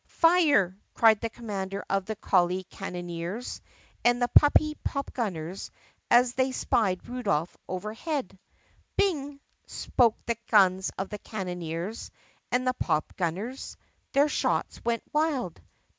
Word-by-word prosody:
"Fire!" 310 - +4 0.2
cried 220 -2 +5
the 230 - -1
commander 200 -4 -5
of 195 -1 0
the 220 - -2
Collie 185 -1 +2
Cannoneers 175 +3 -5 0.4
and 240 0 +4
the 245 - +2
Puppy 305 +1 +5
Popgunners 195 - -3 0.4
as 245 0 +5
they 260 +1 +1
spied 200 -7 0
Rudolph 200 -10 -1
overhead. 215 - -4 0.6
"Bing!" 290 -8 0 0.3
spoke 235 -3 +2
the 235 -1 -1
guns 190 -3 +4
of 190 0 -3
the 210 - -6
Cannoneers 180 0 -5 0.4
and 250 +1 +1
the 255 - +2
Pop 155 -10 -1
gunners. 195 +9 -3 0.4
Their 285 +1 +5
shots 300 - -1
went 235 -1 0
wild. 290 - 0
220 Hz, 120 wpm, -28 LUFS, 185-255 Hz, 0.6 s, cried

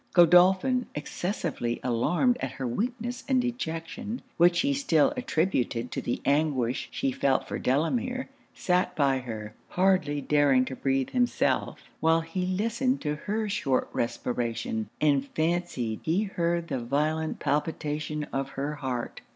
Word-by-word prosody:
Godolphin, 185 +9 +5
excessively 150 - -3
alarmed 150 - +2
at - - -3
her 130 - -5
weakness 240 - -3
and 265 -2 +3
dejection, 225 -2 -4
which 175 +1 +5
he 280 +2 +1
still 220 - +3
attributed 155 - 0
to - - -3
the 120 - -3
anguish 140 -4 +1
she 135 - -1
felt 135 +1 +1
for - - -4
Delamere, 240 - 0 0.2
sat 180 -1 0
by 140 -3 +2
her, 110 -4 -6 0.2
hardly 180 -6 +2
daring 140 -3 +3
to 130 - -5
breathe 135 0 0
himself, 245 -1 0 0.2
while 165 +1 +3
he 180 +3 -3
listened 230 +8 0
to 150 -1 -1
her 210 +7 -2
short 140 -10 0
respiration, 115 -2 -2
and 140 -2 +2
fancied 160 -9 -1
he 175 +6 +1
heard 170 -4 -1
the 130 - -1
violent 155 +5 0
palpitation 150 0 -2
of 135 0 -1
her 140 +2 -1
heart. 130 -4 -4
160 Hz, 135 wpm, -27 LUFS, 135-190 Hz, 0.2 s, Godolphin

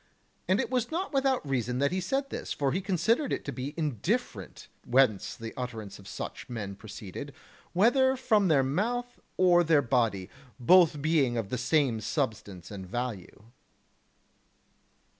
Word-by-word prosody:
And 190 +2 +3
it - - -2
was 250 -2 0
not 350 +2 -3
without 270 - +1
reason 125 -2 -1
that 140 +3 +1
he 185 +1 -1
said 270 +9 -2
this, - - -5
for 140 -2 0
he 185 - -1
considered 205 - +1
it - - -2
to 140 - -3
be 135 +3 -5
indifferent 150 - -2 0.2
whence 120 -6 +2
the 115 -3 -7
utterance 115 -7 -6
of 100 - -14
such - - -7
men 105 -5 -5
proceeded, 110 +7 -8 0.4
whether 260 +7 +4
from 215 -5 +3
their 145 -5 +4
mouth 240 - -2 0.2
or 175 -1 +5
their 155 -3 +3
body; 115 -6 +1 0.3
both 155 +1 +5
being 145 -7 +2
of 110 -4 -3
the 125 - -2
same 130 -3 +1
substance 105 - -3
and 95 -2 -7
value. 115 -3 -5
140 Hz, 155 wpm, -29 LUFS, 115-190 Hz, 0.4 s, or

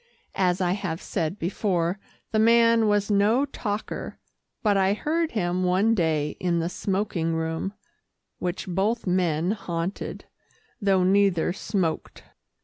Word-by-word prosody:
As 180 0 +2
I 175 -1 +2
have 185 -4 -2
said 165 +4 -3
before, 180 0 -1 0.3
the 215 - +2
man 230 0 +5
was 205 0 +1
no 210 +7 +3
talker, 215 -6 -5 0.5
but 210 -2 +3
I 195 0 +3
heard 320 +6 -1
him 180 -3 0
one 190 +5 +3
day 155 -6 0
in 175 -2 0
the 165 0 0
smoking 185 -4 -1
room, 160 +4 -2 0.7
which 180 0 -3
both 200 +6 0
men 180 -2 +1
haunted, 175 -3 -4 0.6
though 195 -2 +3
neither 190 -3 +3
smoked. 190 -4 -3
190 Hz, 130 wpm, -25 LUFS, 175-210 Hz, 0.7 s, man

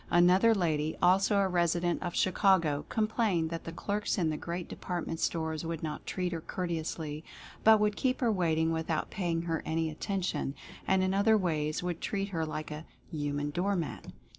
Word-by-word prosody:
Another 185 +6 +5
lady, 155 -5 0
also 190 +3 +4
a 200 -1 +3
resident 175 -1 +1
of 175 -2 -4
Chicago, 185 -6 +2
complained 215 -7 +1
that 165 - -5
the 165 - -5
clerks 205 +6 -2
in 165 -4 +1
the - - -2
great 170 +3 -4
department 175 -2 -4
stores 160 -1 -1
would 165 -1 -4
not 155 -2 -5
treat 180 -1 -2
her 165 -2 -3
courteously, 160 -3 -4 0.4
but 220 -1 +7
would 210 0 +2
keep 255 +2 0
her 240 -3 +2
waiting 165 -4 +1
without 160 -1 -2
paying 170 -3 -1
her 165 -2 -1
any 160 0 -1
attention, 185 -4 -2 0.3
and 190 0 +3
in 185 0 +1
other 215 +3 +4
ways 155 -4 -1
would 175 -2 -3
treat 200 -1 -2
her 165 -4 -2
like 155 0 -5
a 150 +2 -7 0.2
"human 145 -2 -2
door 195 +6 0
mat." 170 -4 -4
170 Hz, 180 wpm, -30 LUFS, 160-190 Hz, 0.4 s, but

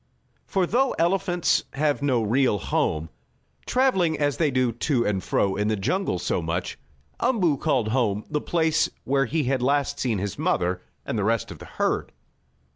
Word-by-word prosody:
For 190 -2 +1
though 255 +7 +1
elephants 175 -1 +1
have 145 0 0
no 130 -5 +1
real 120 +1 +2
home, 80 -3 -1 0.6
traveling 190 -12 +2
as 145 -1 0
they 160 -3 +2
do 130 -2 +1
to 120 +1 0
and 95 -3 -1
fro 95 -1 +1
in 105 +1 0
the 110 - +1
jungle 105 - -1
so 90 - -1
much, 80 +2 -3 0.4
Umboo 195 - +2
called 130 -7 0
"home" 110 -4 0
the 150 - -2
place 160 -2 +1
where 135 0 +1
he 155 +4 -1
had 130 0 0
last 140 +2 +1
seen 120 -5 0
his 100 0 -4
mother 90 0 0 0.2
and 110 - -2
the - - 0
rest 115 +1 0
of - - -10
the - - -10
herd. - - -1
135 Hz, 175 wpm, -25 LUFS, 105-160 Hz, 0.6 s, real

